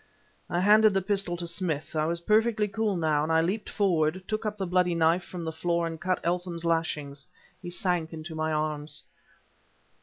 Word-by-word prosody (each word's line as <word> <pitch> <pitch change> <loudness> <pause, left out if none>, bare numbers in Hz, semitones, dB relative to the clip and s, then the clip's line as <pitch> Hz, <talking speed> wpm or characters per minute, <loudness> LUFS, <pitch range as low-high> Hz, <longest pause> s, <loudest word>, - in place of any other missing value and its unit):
I 175 - 0
handed 210 +1 +6
the 195 - +3
pistol 195 -3 -1
to 170 - -4
Smith; 170 -3 -3
I 155 0 +1
was 170 +1 -2
perfectly 215 +2 +2
cool, 205 -1 -1
now; 155 -3 +2
and 155 +2 -1
I 160 0 +4
leaped 195 +6 -2
forward, 180 -3 +1
took 215 0 -2
up 210 0 -3
the 195 - -2
bloody 180 -1 +2
knife 165 +2 +3
from 180 -2 -7
the 160 - -3
floor 170 +1 0
and 165 -1 -5
cut 185 -1 0
Eltham's 175 -1 -2
lashings. 150 -4 -1 0.3
He 175 - -6
sank 175 -3 -1
into 160 0 -7
my 160 0 -1
arms. 150 -1 -2
170 Hz, 190 wpm, -28 LUFS, 160-190 Hz, 0.3 s, handed